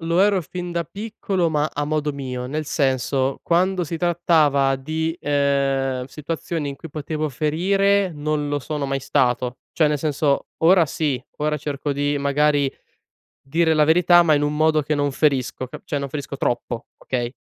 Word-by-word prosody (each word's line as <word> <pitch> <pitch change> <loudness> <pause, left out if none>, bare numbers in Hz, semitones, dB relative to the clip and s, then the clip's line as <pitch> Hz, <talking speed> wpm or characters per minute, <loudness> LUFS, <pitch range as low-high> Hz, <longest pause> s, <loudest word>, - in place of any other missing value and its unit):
lo 165 +2 +1
ero 200 -1 +4
fin 175 +3 -6
da 170 0 0
piccolo 195 0 -2
ma 150 -1 0
a 145 - -2
modo 150 0 -1
mio. 125 -3 -5
Nel 155 +4 -3
senso, 135 -1 0
quando 180 +1 +2
si 165 +1 -4
trattava 160 -6 +2
di, 160 +4 -3
ehm, 135 -2 0
situazioni 150 +1 -4
in 140 - -6
cui 160 +3 -11
potevo 155 +1 -3
ferire, 190 +7 +1
non 150 0 -2
lo 145 0 0
sono 145 +1 -4
mai 135 0 -1
stato. 125 -1 0
Cioè, 155 - +3
nel 150 - +1
senso, 145 -1 0 0.2
ora 170 -1 +6
sì. 140 -4 -2
Ora 150 0 0
cerco 145 0 -3
di 145 +1 0
magari 145 0 +2 0.7
dire 160 +4 +1
la 155 -1 +4
verità 175 +2 +5
ma 160 -3 +4
in 145 - +1
un 145 0 0
modo 155 0 +3
che 150 +2 -1
non 145 -1 0
ferisco, 130 -3 0
ca - - -10
cioè - - -4
non 140 -1 -5
ferisco 140 -1 -5
troppo, 120 -2 -2
okay, 120 -2 -3
150 Hz, 175 wpm, -22 LUFS, 140-165 Hz, 0.7 s, ora